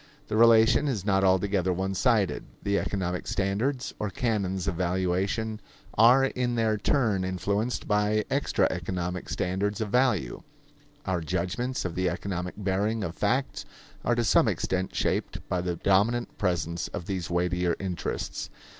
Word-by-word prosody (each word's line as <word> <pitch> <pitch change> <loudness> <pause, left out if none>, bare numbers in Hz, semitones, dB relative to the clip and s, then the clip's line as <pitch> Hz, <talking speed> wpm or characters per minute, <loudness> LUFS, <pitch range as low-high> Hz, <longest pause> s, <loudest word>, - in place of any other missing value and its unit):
The 105 - -1
relation 115 +4 +5
is 110 -9 -2
not 95 -2 +2
altogether 95 0 +2
one 95 +2 -1
sided. 100 0 +1 0.2
The 100 0 +1
economic 90 -2 -3
standards 115 +8 -1
or 105 - -1
canons 95 -4 -1
of 100 - +1
valuation 95 +5 -1 0.3
are 125 +5 +6
in 125 -2 -1
their 110 -2 +2
turn 105 -3 +1
influenced 100 +6 -1
by 105 0 +2
extra 140 +1 +2
economic 90 0 -3
standards 100 +3 -1
of 110 -2 -2
value. 120 - +1 0.6
Our 95 -2 -1
judgments 95 +10 -2
of 90 - -2
the 90 +1 0
economic 90 0 -4
bearing 105 +2 0
of 85 - -3
facts 130 +6 0 0.4
are 120 - +2
to 120 - +1
some 110 - +4
extent 95 0 -1
shaped - - -1
by 90 - -1
the 90 -1 -2
dominant 105 +7 +1
presence 85 -3 -1
of 85 - -6
these 95 -3 -3
weightier 90 0 0
interests. 95 -2 -4
100 Hz, 145 wpm, -27 LUFS, 90-110 Hz, 0.6 s, are